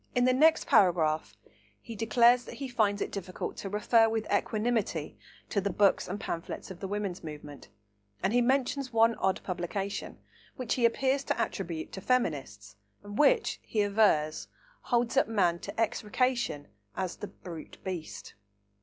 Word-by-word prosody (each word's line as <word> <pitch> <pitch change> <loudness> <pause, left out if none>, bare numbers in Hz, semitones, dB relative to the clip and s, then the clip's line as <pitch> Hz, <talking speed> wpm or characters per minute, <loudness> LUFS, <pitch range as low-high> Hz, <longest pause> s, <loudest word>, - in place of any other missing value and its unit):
In 245 0 +3
the 255 - +4
next 315 +5 +4
paragraph 160 -5 +3 0.4
he 230 - -9
declares 235 +3 +4
that - - -9
he 275 - -5
finds 215 -5 +1
it - - -6
difficult 185 -2 -5
to 195 - -5
"refer 225 +2 +3
with 220 -1 -1
equanimity" 210 -6 -1 0.3
to 200 - 0
the 200 - -1
books 200 -1 +2
and 200 +3 -4
pamphlets 165 +1 -5
of 180 - -9
the 195 - -4
women's 200 -3 -3
movement, 150 -5 -9 0.5
and 195 - +1
he 245 - +4
mentions 265 +1 0
one 230 0 +4
odd 190 0 +1
publication, 190 +2 -4 0.4
which 255 -4 -2
he 245 - +2
appears 265 +4 +2
to - - -1
attribute 170 -4 -3
to 190 - -7
feminists 135 - -1 0.3
and 205 +1 -7
which, 445 +10 +3
he 210 -2 0
avers, 200 -7 +2 0.3
holds 240 +1 0
up - - +4
man 180 -6 +1
to 200 +4 -7
execration 230 - 0 0.3
as 185 -2 -3
"the 205 - -6
brute 165 -5 -10
beast." 180 -4 -6
205 Hz, 160 wpm, -29 LUFS, 180-240 Hz, 0.5 s, the